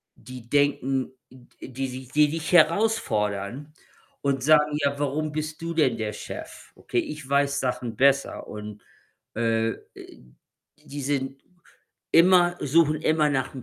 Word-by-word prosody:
die 125 0 -12
denken 135 -2 +1 0.2
d 125 -1 -14
die 135 +1 -3
sich 130 0 -8
die 150 0 +4
dich 160 +1 -4
herausfordern 145 - +1 0.5
und 135 -2 -1
sagen: 150 0 +4
„Ja, 140 0 +1
warum 150 +2 -1
bist 155 +1 -5
du 165 0 -4
denn 130 -8 +2
der 110 -1 -3
Chef? - - -9
Okay, 120 - -2
ich 150 0 -6
weiß 140 0 +2
Sachen 125 -3 -3
besser.“ 140 +2 +2
Und, 105 0 -8 0.5
äh, 115 0 +1 0.3
äh, - - -13 0.6
die 145 0 -7
sind 135 0 -2 0.7
immer 175 +1 +5
suchen 155 +1 +2
immer 155 -1 +2
nach'm 130 -2 -2
140 Hz, 135 wpm, -25 LUFS, 125-150 Hz, 0.7 s, immer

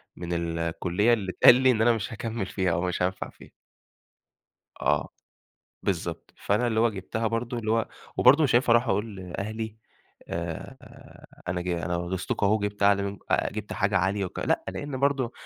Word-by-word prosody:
من 85 0 -5 0.2
الكُلّية 90 +6 +1
اللي 100 -5 -1
اتقال - - +9
لي 130 0 +4
إن 110 -3 0
أنا 120 +1 +5
مش 115 +2 -4
هاكمّل 115 -1 -3
فيها 95 -2 -1
ومش 90 0 -1
هانفع 95 +1 -1
فيها. - - -16 1.3
آه. 75 +1 +1 0.7
بالضبط. 85 -3 -3
فأنا 105 +5 0
اللي 110 -2 +1
هو 115 0 +4
جِبتها 110 +3 -3
برضه 115 +2 -2
اللي 110 -2 -3
هو 115 0 +1 0.3
وبرضه 140 +5 +6
مش 135 - +1
هينفع 120 0 +4
أروح 120 0 +4
أقول 105 -1 -1
لأهلي، 105 +4 -5 0.5
آآ 85 -1 -5 0.7
أنا 90 0 -1
ج 90 - -5
أنا 85 0 -1
غيظتكم 90 +3 -1
أهو 100 - +4
وجِبت 105 -1 -3
أعلي 100 0 +4
منك 100 0 -4
آآ - - +1
جِبت 105 0 -5
حاجة 100 -1 +1
عالية 95 +2 0
وك 90 - -7
لأ، - - 0
لإن 140 -3 -5
برضه 135 -3 +1
105 Hz, 175 wpm, -27 LUFS, 90-115 Hz, 1.3 s, اتقال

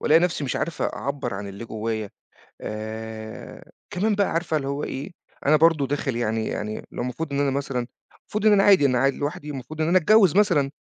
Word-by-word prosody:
والاقي 160 +2 +5
نفْسي 175 -4 0
مش 130 - -2
عارف 165 0 -3
أعَبّر 140 -6 -3
عن 100 +1 -5
اللي 100 +4 -8
جوايا، 110 -2 -3 0.5
آآ، 110 0 -7 0.2
كمان 205 +4 +1
بقى 200 -1 +1
عارفة 165 -1 0
اللي 135 -2 -2
هو 140 +1 -2
إيه، 140 +7 -5 0.4
أنا 155 +2 +6
برضه 155 -3 +4
داخل 135 -2 -2
يعني 110 -1 -1
يعني 105 +1 -4
لو - - -4
المفروض 140 +5 -4
إن 140 - 0
أنا 140 - +2
مثلًا، 135 -3 -2 0.3
المفروض 215 +1 -3
إن 215 - +7
أنا 195 -1 +5
عادي 190 -8 +6
أنا 125 -2 +2
قاعد 135 +1 +2
لوحدي 145 +1 -4
والمفروض 145 +3 -7
إن 155 - +1
أنا 180 +2 +5
أتجوِّز 195 0 +5
مثلًا، 170 -10 +3
140 Hz, 205 wpm, -24 LUFS, 115-165 Hz, 0.5 s, إن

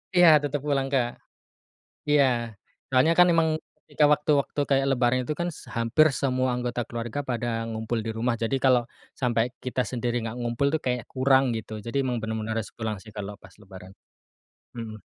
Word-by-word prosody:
Iya 175 -1 +7
tetep 145 -1 -2
pulang 140 -2 0
Kak, 125 -3 +2 1.0
iya 145 -1 +5 0.6
soalnya 135 +5 +4
kan 180 - +8
emang 165 -1 +3 0.4
ketika 150 - +1
waktu-waktu 150 -1 +1
kayak 135 0 +3
lebaran 125 -1 +2
itu 150 - 0
kan 175 - 0
s - - -11 0.2
hampir 115 +7 +4
semua 130 -1 +1
anggota 125 0 -2
keluarga 120 +4 -4
pada 120 0 -2 0.2
ngumpul 110 +1 -3
di - - -1
rumah 120 +2 0
jadi 125 +4 +1
kalau, 130 -2 +5 0.4
sampai 120 -3 +2 0.2
kita 125 0 0
sendiri 120 -1 -2
nggak 115 +1 -5
ngumpul 120 +3 0
tuh 160 - 0
kayak 125 -2 -1
kurang 135 0 +4
gitu 110 - -7
jadi 140 +4 0
emang 125 -2 -1
bener-bener 110 0 -3
harus 110 - -4
pulang 110 -2 -3
sih 110 - -13
kalau 105 0 -5
pas 95 - -15
lebaran, 95 -1 -12 0.8
mhm. 110 -2 -7
125 Hz, 175 wpm, -26 LUFS, 115-140 Hz, 1.0 s, kan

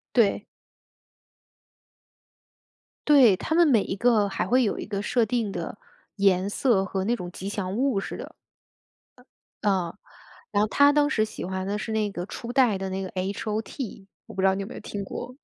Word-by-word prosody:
对。 225 -5 +3 2.6
对， 260 -9 +7
她 315 - -3
们 340 -2 +5
每 225 -7 +4
一 - - -3
个 215 -2 +3
还 180 -2 -2
会 250 +4 +3
有 205 - -1
一 - - -5
个 200 -1 -3
设 230 +1 +1
定 225 -3 -1
的 - - -5 0.4
颜 195 -1 +3
色， 210 -2 +2
和 190 0 -2
那 235 - +1
种 180 -7 -6
吉 190 +2 -6
祥 195 -1 -3
物 255 -5 +1
似 - - -6
的。 - - -9 1.3
啊。 185 -5 +1 0.6
然 205 - +2
后 215 - +2
她 285 +4 +5
当 290 0 +3
时 215 -7 +2
喜 215 - -8
欢 190 +1 -3
的 205 +1 -1
是 220 +1 -5
那 215 -2 0
个 175 -2 -5
初 235 0 -6
代 245 -7 +4
的 190 0 -4
那 190 +1 -3
个 185 - -5
H-O-T， 205 +3 -4 0.2
我 - - -12
不 190 - -2
知 - - +3
道 190 - +3
你 195 - -3
有 195 - -5
没 - - -9
有 - - -7
听 200 -1 -5
过， 245 +5 -7
205 Hz, 215 characters per minute, -26 LUFS, 195-240 Hz, 2.6 s, 对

